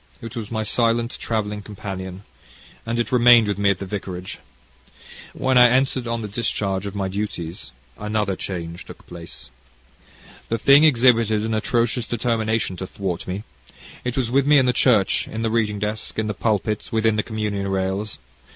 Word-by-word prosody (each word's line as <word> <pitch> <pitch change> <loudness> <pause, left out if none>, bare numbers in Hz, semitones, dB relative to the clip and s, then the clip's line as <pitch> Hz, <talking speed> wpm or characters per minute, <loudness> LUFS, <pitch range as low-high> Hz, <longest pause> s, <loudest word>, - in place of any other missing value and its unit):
It 115 -1 -8
was 110 -3 -5
my 110 -1 -2
silent 115 +2 +1
travelling 105 -2 -2
companion, 95 -2 -7 0.6
and 115 +1 -1
it 120 - -1
remained 120 -2 +6
with 100 -1 -2
me 100 -1 +3
at 100 - +2
the 100 - -6
vicarage. 95 -2 -6 0.9
When 130 -1 +2
I 125 0 +8
entered 130 0 +1
on 115 0 -2
the - - -3
discharge 100 -2 -2
of 100 - -7
my 100 -1 -1
duties, 95 -5 -5 0.3
another 105 -2 -1
change 85 -3 -5
took - - -13
place. 85 -7 -8 1.0
The 115 - 0
thing 140 +5 +6
exhibited 115 -6 +4
an 110 0 -2
atrocious 115 +2 0
determination 115 -4 -1
to 95 - -5
thwart 90 -3 -4
me. 95 +3 -4 0.6
It 125 0 -3
was 120 -3 0
with 135 +1 +2
me 150 0 +6
in 130 - +4
the 125 - +2
church 115 -6 +3
in 110 - -5
the 115 -1 0
reading 110 -2 +1
desk 105 +2 -4
in 110 - 0
the 105 - -2
pulpit 105 +1 -1
within 110 -1 +2
the 105 - +1
communion 105 -3 -3
rails. 95 +2 -2
110 Hz, 175 wpm, -22 LUFS, 100-115 Hz, 1.0 s, I